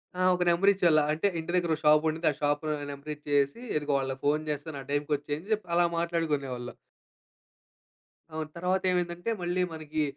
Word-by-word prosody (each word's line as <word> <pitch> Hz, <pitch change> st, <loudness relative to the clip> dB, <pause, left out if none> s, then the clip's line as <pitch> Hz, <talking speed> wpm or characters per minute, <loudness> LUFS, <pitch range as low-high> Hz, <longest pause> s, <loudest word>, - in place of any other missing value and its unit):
ఆ! 185 Hz, -, -2 dB
ఒక 180 Hz, -, 0 dB
నెంబర్ 180 Hz, +4 st, +4 dB
ఇచ్చేవాళ్ళు. 170 Hz, -5 st, +4 dB
అంటే, 160 Hz, +6 st, +1 dB
ఇంటి 160 Hz, +2 st, -4 dB
దగ్గర 175 Hz, -2 st, +1 dB
ఒక -, -, -12 dB
షాపుండింది. 155 Hz, +2 st, +3 dB
ఆ -, -, -6 dB
షాప్‌లో 145 Hz, +1 st, 0 dB, 0.2 s
నెంబర్ 140 Hz, +2 st, -7 dB
ఇచ్చేసి, 145 Hz, +3 st, 0 dB, 0.2 s
ఇదిగో 145 Hz, -1 st, -1 dB
వాళ్ళకి 135 Hz, 0 st, -4 dB
ఫోన్ 150 Hz, +2 st, +2 dB
చేస్తాను, 145 Hz, 0 st, -4 dB
ఆ -, -, -20 dB
టైమ్‌కి 145 Hz, +1 st, 0 dB
వచ్చేయ్, 145 Hz, +1 st, -4 dB
అని 200 Hz, -, -15 dB
చెప్పి, 210 Hz, -3 st, -2 dB
అలా 175 Hz, 0 st, +5 dB
మాట్లాడుకునేవాళ్ళం. 145 Hz, -8 st, -2 dB, 1.6 s
అవును. 155 Hz, -1 st, -4 dB
తర్వాతేమైందంటే, 180 Hz, +1 st, 0 dB
మళ్ళీ 175 Hz, +1 st, 0 dB
మనకీ, 155 Hz, -1 st, -2 dB
155 Hz, 165 wpm, -29 LUFS, 145-175 Hz, 1.6 s, అలా